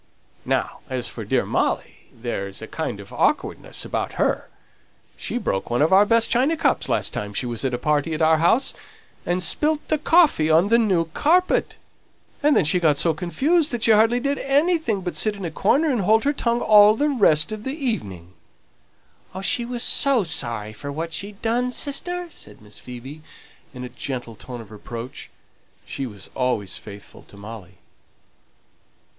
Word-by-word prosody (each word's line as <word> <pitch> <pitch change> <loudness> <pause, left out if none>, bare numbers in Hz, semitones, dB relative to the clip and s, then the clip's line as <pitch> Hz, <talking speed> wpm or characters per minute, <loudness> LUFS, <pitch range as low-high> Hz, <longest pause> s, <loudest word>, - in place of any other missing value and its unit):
Now - - -1
as 130 -2 -3
for - - -7
dear - - 0
Molly, - - -2
there's 100 -5 -5
a - - -7
kind - - -4
of - - -12
awkwardness - - -1
about - - -3
her - - -1 0.7
she - - -4
broke 95 - -2
one 120 +4 +2
of 160 - +2
our 200 +2 +6
best 230 0 +3
china 275 +7 +2
cups - - +1
last - - 0
time 105 0 -5
she - - -2
was 120 0 -2
at 130 -2 -1
a - - -3
party 150 +4 0
at 155 - -4
our 160 0 +4
house, 225 - +3 0.5
and 180 +1 0
spilt 300 - 0
the 310 - +1
coffee 305 - +4
on 165 +5 +4
the 230 +1 +5
new 190 -7 +2
carpet; 350 - +1 0.6
and 295 0 +3
then - - +3
she 165 +5 +3
got 155 -4 +2
so 165 +2 +1
confused 285 - +1
that 240 -3 -3
she 225 - +4
hardly 225 +3 +4
did 280 +2 -1
anything 285 - +1
but 180 -1 -5
sit 215 -1 +1
in 195 -2 -7
a 165 - -4
corner 285 - +2
and 240 -5 0
hold 220 +4 +3
her 285 - +1
tongue 235 -3 0
all 210 0 +6
the 290 +5 +1
rest 200 - +3
of 215 -1 -6
the 265 +3 -4
evening." 100 - -4 1.1
"She 235 +4 +1
was 240 0 -2
so 275 -6 +4
sorry 115 - -3
for 140 +7 -7
what 165 +3 -5
she'd 200 +3 -6
done, 240 +2 +1
sister," 350 +7 -1
said - - -13
Miss 105 -1 -13
Phoebe, 130 +5 -10 0.5
in 125 -2 -9
a 125 - -6
gentle 120 -4 -6
tone 120 +2 -9
of 110 - -14
reproach; 115 +3 -8 0.6
she 135 - -5
was 105 -4 -12
always 125 -7 -1
faithful 100 -1 -12
to 100 - -17
Molly. 100 -3 -10
180 Hz, 180 wpm, -22 LUFS, -, 1.1 s, our